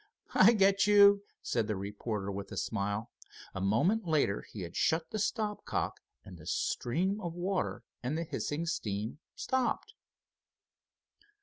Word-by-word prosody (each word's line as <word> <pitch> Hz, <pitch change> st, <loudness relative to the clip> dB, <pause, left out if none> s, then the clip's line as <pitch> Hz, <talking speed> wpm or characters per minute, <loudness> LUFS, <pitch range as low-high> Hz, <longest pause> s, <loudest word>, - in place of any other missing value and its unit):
"I 205 Hz, +5 st, +7 dB
get 195 Hz, -1 st, +4 dB
you," 200 Hz, -1 st, +7 dB, 0.2 s
said 115 Hz, -3 st, 0 dB
the 105 Hz, -, -1 dB
reporter 100 Hz, +1 st, -4 dB
with 100 Hz, 0 st, -6 dB
a -, -, -6 dB
smile. 105 Hz, +1 st, -2 dB, 0.4 s
A 95 Hz, -, -4 dB
moment 170 Hz, -, +2 dB
later 145 Hz, -11 st, +2 dB
he 105 Hz, -, -9 dB
had 85 Hz, -1 st, -7 dB
shut 160 Hz, 0 st, +1 dB
the 215 Hz, -, -2 dB
stop 210 Hz, 0 st, -1 dB
cock -, -, -2 dB, 0.3 s
and 90 Hz, -3 st, -11 dB
the 75 Hz, -, -12 dB
stream 185 Hz, -, 0 dB
of 170 Hz, -3 st, -4 dB
water 185 Hz, +2 st, -2 dB, 0.2 s
and 130 Hz, +6 st, -2 dB
the 165 Hz, -, -1 dB
hissing 155 Hz, 0 st, -3 dB
steam 110 Hz, -5 st, -3 dB, 0.2 s
stopped. 260 Hz, -2 st, -1 dB
155 Hz, 145 wpm, -32 LUFS, -, 0.4 s, I